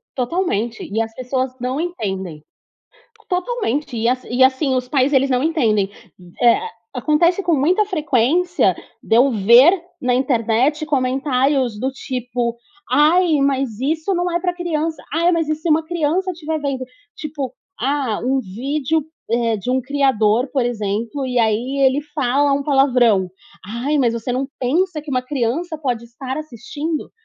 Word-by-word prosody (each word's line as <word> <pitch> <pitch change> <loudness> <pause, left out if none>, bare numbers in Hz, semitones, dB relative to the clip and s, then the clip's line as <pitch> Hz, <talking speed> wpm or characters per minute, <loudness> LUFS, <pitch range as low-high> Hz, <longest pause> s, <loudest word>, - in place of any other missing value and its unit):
Totalmente, 245 - -2
e 220 - 0
as 225 0 -6
pessoas 255 +2 -2
não 255 +4 -2
entendem. 190 - -4 0.9
Totalmente 360 - -2
e 225 +1 0
a 245 - +4
e - - -14
a - - -12
e 260 - +6
assim, 260 +1 +2
os 250 -1 -1
pais, 270 +1 +2
eles 270 0 +3
não 255 0 +1
entendem, 225 - +1 0.5
eh. 240 -1 +4 0.2
Acontece 320 +8 +2
com 345 - +2
muita 345 +9 +2
frequência 335 - +1 0.3
de - - +1
eu 260 +3 +5
ver 240 - +6 0.2
na 250 -1 +2
internet 255 +3 +1
comentários 265 -3 0
do 260 +3 -1
tipo: 245 -3 -3 0.3
"Ai, 325 +2 +4
mas 270 -5 0
isso 315 +7 -1
não 355 0 0
é 345 - 0
pra 355 0 -2
criança. 325 -3 -2
Ai 335 +3 +3
mas 330 -3 0
e - - +2
se 315 +2 -4
uma 315 +1 +3
criança 345 +3 0
estiver 320 -2 -4
vendo?" 275 -3 -2 0.3
Tipo, 285 -4 -5 0.3
ah, 265 -4 -1
um 265 +2 +1
vídeo, 270 +8 -2 0.3
eh, 230 -1 +1
de 205 +5 -5
um 260 +1 +2
criador, 255 -4 +2
por 265 -4 +1
exemplo, 225 +3 -2
e 250 -1 -2
aí 235 +4 +1
ele 265 +2 +2
fala 280 +1 +2
um 280 0 0
palavrão: 250 -9 +3 0.3
"Ai, 240 +9 -2
mas 240 -3 +2
você 235 +2 -3
não 260 +2 -1
pensa 320 +7 0
que 295 -1 -8
uma 255 -1 +1
criança 280 +6 -2
pode 250 -6 -2
estar 255 +3 -6
assistindo?" 305 +3 -5
270 Hz, 160 wpm, -20 LUFS, 240-310 Hz, 0.9 s, e